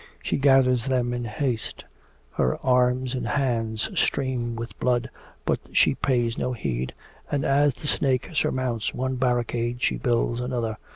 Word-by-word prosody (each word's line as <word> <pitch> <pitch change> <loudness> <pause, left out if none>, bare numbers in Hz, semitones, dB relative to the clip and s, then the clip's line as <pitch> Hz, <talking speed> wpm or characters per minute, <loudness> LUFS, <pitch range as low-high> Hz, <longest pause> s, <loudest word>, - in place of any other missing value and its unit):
She - - 0
gathers 135 -3 +4
them 125 -2 +1
in 120 -1 -3
haste; 115 +1 -3 0.5
her 65 - +1
arms 125 0 +2
and 130 - -2
hands 115 -5 0
stream 125 -3 0
with 115 +1 -7
blood, 125 0 +1 0.3
but - - +1
she - - +5
pays 120 -3 0
no 125 - -1
heed, 65 - -3 0.3
and 140 -1 0
as 140 -1 +3
the - - -10
snake 135 -2 +1
surmounts 130 -7 -1
one 130 0 -1
barricade 120 -1 0
she - - +1
builds 120 -1 0
another. 120 -3 -2
125 Hz, 150 wpm, -25 LUFS, 120-130 Hz, 0.5 s, she